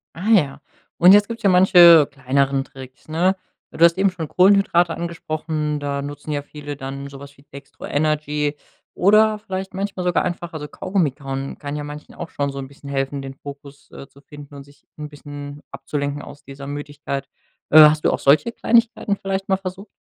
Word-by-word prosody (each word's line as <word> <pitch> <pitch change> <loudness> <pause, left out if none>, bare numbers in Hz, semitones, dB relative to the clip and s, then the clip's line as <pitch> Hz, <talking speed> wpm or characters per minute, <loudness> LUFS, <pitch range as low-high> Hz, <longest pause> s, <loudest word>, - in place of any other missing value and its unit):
Ah, 185 +7 -4
ja. 150 -10 +2 0.4
Und 180 +2 +7
jetzt 205 0 +5
gibt's 230 0 -7
ja 200 - +4
manche 175 -4 +7
kleineren 135 0 0
Tricks, 130 0 -14
ne? 180 +4 +1 0.4
Du 165 - 0
hast 170 +1 +5
eben 195 0 +2
schon 165 -3 -6
Kohlenhydrate 180 -2 +3
angesprochen, 155 -3 -4
da 140 -1 -3
nutzen 145 +1 -7
ja 145 -1 -2
viele 145 -1 -9
dann 140 0 -7
so 135 -1 -11
was 140 0 -13
wie - - -19
Dextro 140 0 -11
Energy 150 0 -1 0.4
oder 215 +3 +3
vielleicht 190 -2 -6
manchmal 195 -1 -4
sogar 180 0 +1
einfach 175 -1 -5
also, 150 -2 -6
Kaugummi 185 -2 -1
kauen 135 0 -6
kann 145 0 -6
ja 150 - -4
manchen 150 +1 -10
auch 170 - -8
schon 140 -1 -3
so 140 - -7
'n 135 - -6
bisschen 140 +1 -13
helfen, 135 0 -2
den 135 0 -7
Fokus, 140 +1 -12
äh, 135 - -11
zu 140 - -21
finden 145 -1 -13
und 140 -1 -10
sich 140 0 -23
'n 150 0 -6
bisschen 145 0 -10
abzulenken 145 0 -4
aus 145 - -13
dieser 140 0 -10
Müdigkeit. 145 -1 -5 0.5
Äh, 155 - +9
hast 150 0 +7
du - - +4
auch - - -2
solche 155 +12 +3
Kleinigkeiten 230 -3 +1
vielleicht 195 0 -4
mal 190 - +2
versucht? 195 +2 -8
150 Hz, 195 wpm, -21 LUFS, 140-180 Hz, 0.5 s, Äh